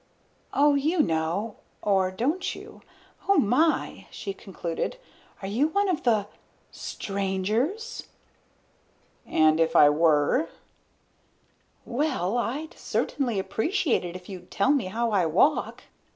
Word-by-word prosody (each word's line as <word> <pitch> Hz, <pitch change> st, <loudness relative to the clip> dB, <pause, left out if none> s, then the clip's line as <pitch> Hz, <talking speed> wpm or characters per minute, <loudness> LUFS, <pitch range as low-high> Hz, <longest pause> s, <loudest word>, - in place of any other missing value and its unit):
"Oh, 290 Hz, +1 st, +4 dB
you 305 Hz, +4 st, +2 dB
know 165 Hz, +7 st, -1 dB, 0.3 s
or 190 Hz, -2 st, +2 dB
don't 300 Hz, -, -1 dB
you? -, -, -12 dB, 0.5 s
Oh, 395 Hz, -, +5 dB
my," 290 Hz, +6 st, +2 dB
she 195 Hz, -, -6 dB
concluded, 190 Hz, -, -4 dB, 0.5 s
"are -, -, -3 dB
you 235 Hz, +9 st, +2 dB
one 400 Hz, +5 st, +1 dB
of 350 Hz, -3 st, 0 dB
the 220 Hz, -7 st, +2 dB, 0.5 s
strangers?" 210 Hz, -, -2 dB, 1.2 s
"And 155 Hz, 0 st, +4 dB
if 165 Hz, 0 st, +2 dB
I 145 Hz, -3 st, +8 dB
were?" 155 Hz, -, +3 dB, 1.4 s
"Well, 240 Hz, -, -1 dB
I'd 275 Hz, +7 st, -2 dB
certainly 245 Hz, -7 st, -2 dB
appreciate 240 Hz, -, 0 dB
it 175 Hz, 0 st, -6 dB
if 180 Hz, -1 st, -9 dB
you'd 180 Hz, -3 st, -9 dB
tell 200 Hz, +8 st, +2 dB
me 280 Hz, -8 st, +2 dB
how 230 Hz, +5 st, -1 dB
I 185 Hz, -5 st, +2 dB
walk." 200 Hz, -, +2 dB
215 Hz, 120 wpm, -26 LUFS, 185-295 Hz, 1.4 s, I